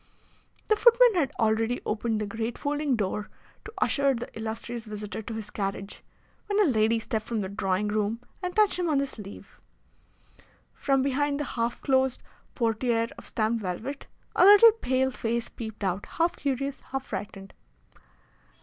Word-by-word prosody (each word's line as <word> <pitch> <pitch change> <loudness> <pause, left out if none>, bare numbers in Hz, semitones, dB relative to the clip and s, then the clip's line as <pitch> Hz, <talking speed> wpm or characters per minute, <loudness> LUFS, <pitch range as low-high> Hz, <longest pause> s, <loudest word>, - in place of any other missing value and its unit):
The 430 - +4
footman 475 +1 +6
had 300 -7 +1
already 225 +2 +1
opened 220 0 -1
the 210 - -1
great 225 +3 -4
folding 290 -2 0
door 210 0 -2 0.4
to 430 - -9
usher 280 -2 +2
the 240 +1 -7
illustrious 225 +1 -5
visitor 210 0 -6
to 220 +1 -6
his 215 -1 -7
carriage, 195 0 -4 0.5
when 410 0 +1
a - - +6
lady 225 -3 +3
stepped 220 -1 -3
from 230 -3 -1
the 190 - -4
drawing 200 0 -1
room 215 +2 0 0.2
and 360 -1 -4
touched 425 -3 +3
him 350 -2 0
on 300 - +2
the 280 - +2
sleeve. 210 -7 -11 1.1
From 270 -2 +1
behind 280 +1 0
the - - 0
half 235 -1 -2
closed 265 -1 +1 0.3
portiere 230 0 +1
of - - -11
stamped 220 +1 0
velvet 220 +10 -5 0.3
a - - +5
little 415 +4 +9
pale 265 - 0
face 235 -1 -2
peeped 220 -2 -7
out, 190 +1 -1
half 335 +1 0
curious, 275 0 -2
half 270 0 -5
frightened. 195 -1 -7
235 Hz, 160 wpm, -27 LUFS, 215-280 Hz, 1.1 s, little